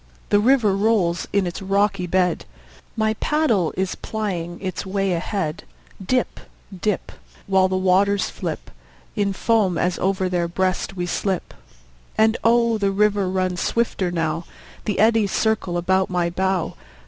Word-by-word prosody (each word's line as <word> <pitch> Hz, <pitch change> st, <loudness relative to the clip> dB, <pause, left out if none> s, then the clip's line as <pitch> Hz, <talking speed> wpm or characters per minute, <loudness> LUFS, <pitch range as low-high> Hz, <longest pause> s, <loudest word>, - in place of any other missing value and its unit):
The 205 Hz, -, +4 dB
river 225 Hz, -3 st, +3 dB
rolls 195 Hz, -5 st, +1 dB
in 200 Hz, -1 st, +2 dB
its 175 Hz, +1 st, -5 dB
rocky 195 Hz, -1 st, +1 dB
bed; 180 Hz, 0 st, +1 dB, 0.5 s
My 220 Hz, 0 st, +2 dB
paddle 235 Hz, -, +1 dB
is 190 Hz, 0 st, 0 dB
plying 180 Hz, -6 st, -4 dB
its 185 Hz, -2 st, -4 dB
way 195 Hz, -1 st, -1 dB
ahead; 175 Hz, 0 st, -2 dB, 0.4 s
Dip, 250 Hz, +6 st, 0 dB, 0.4 s
dip, 200 Hz, +2 st, -2 dB, 0.3 s
While 190 Hz, -1 st, +3 dB
the 185 Hz, 0 st, -1 dB
waters 190 Hz, +2 st, +2 dB
flip -, -, -6 dB, 0.4 s
In 200 Hz, -1 st, +1 dB
foam 195 Hz, -3 st, +1 dB
as 180 Hz, +2 st, 0 dB
over 190 Hz, 0 st, 0 dB
their 175 Hz, -1 st, 0 dB
breast 185 Hz, +2 st, -1 dB
we 175 Hz, -1 st, -2 dB
slip. 185 Hz, +1 st, -2 dB, 0.6 s
And 220 Hz, +1 st, +4 dB
oh, 235 Hz, -1 st, +3 dB
the 200 Hz, -1 st, +2 dB
river 200 Hz, -1 st, +2 dB
runs 185 Hz, -1 st, -1 dB
swifter 230 Hz, -5 st, 0 dB
now; 165 Hz, -1 st, -2 dB, 0.4 s
The 210 Hz, -, -1 dB
eddies 220 Hz, -2 st, +3 dB
circle 220 Hz, -5 st, 0 dB
about 190 Hz, +2 st, +1 dB
my 175 Hz, -2 st, 0 dB
bow. 190 Hz, -1 st, 0 dB
190 Hz, 145 wpm, -22 LUFS, 180-210 Hz, 0.6 s, The